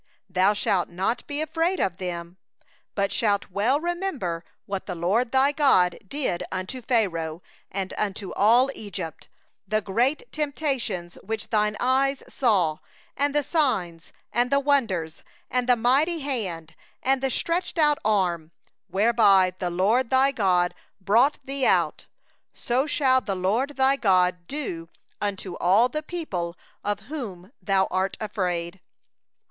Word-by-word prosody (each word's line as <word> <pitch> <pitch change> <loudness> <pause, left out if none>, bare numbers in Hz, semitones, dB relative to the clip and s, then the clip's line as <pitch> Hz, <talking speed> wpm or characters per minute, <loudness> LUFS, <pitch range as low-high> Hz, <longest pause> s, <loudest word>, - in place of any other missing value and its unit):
18thou 190 +3 +3
shalt 190 -3 0
not 190 +7 -2
be 290 +1 -3
afraid 330 +4 0
of 180 -2 0
them; 175 -1 -5 0.6
thou 200 -1 +1
shalt 200 -2 0
well 220 +9 +2
remember 320 - -3 0.2
what 195 -1 -5
the 180 - -4
LORD 205 +9 +1
thy 270 +2 +4
God 265 - +3
did 255 -8 -2
unto 185 +8 -4
Pharaoh, 175 -9 0 0.3
and 190 0 -4
unto 200 -1 -3
all 240 +6 +4
Egypt: 185 -7 -7 0.4
19the 215 0 +1
great 255 - 0
trials 275 - -2
which 220 +2 -5
thine 210 -1 +1
eyes 270 +2 +1
saw, 185 - +1 0.4
and 285 +1 0
the 295 - +3
signs, 210 - -1 0.2
and 245 +1 +2
the 280 +1 +3
wonders, 220 - 0 0.3
and 250 0 0
the 245 - +7
mighty 280 +8 +2
hand, 190 - -3 0.3
and 265 0 +2
the 270 - +1
outstretched 340 +8 -1 0.3
arm, 180 -6 +1 0.4
whereby 200 -3 +4
the 180 - -1
LORD 215 +8 +2
thy 265 +1 +4
God 180 -7 +2 0.3
brought 225 +9 +3
thee 275 0 -3
out; - - +1 0.5
so 255 +4 0
shall 260 -3 +3
the 200 -5 -3
LORD 225 +10 0
thy 265 +1 +4
God 180 -6 +2
do 175 - -5 0.3
unto 195 -3 -3
all 200 +8 +4
the 305 - -3
peoples 200 - -4 0.3
of 205 0 -2
whom 205 - -7
thou 190 +1 +2
art 190 +1 -1
afraid. 180 -4 -3
210 Hz, 140 wpm, -25 LUFS, 185-270 Hz, 0.6 s, the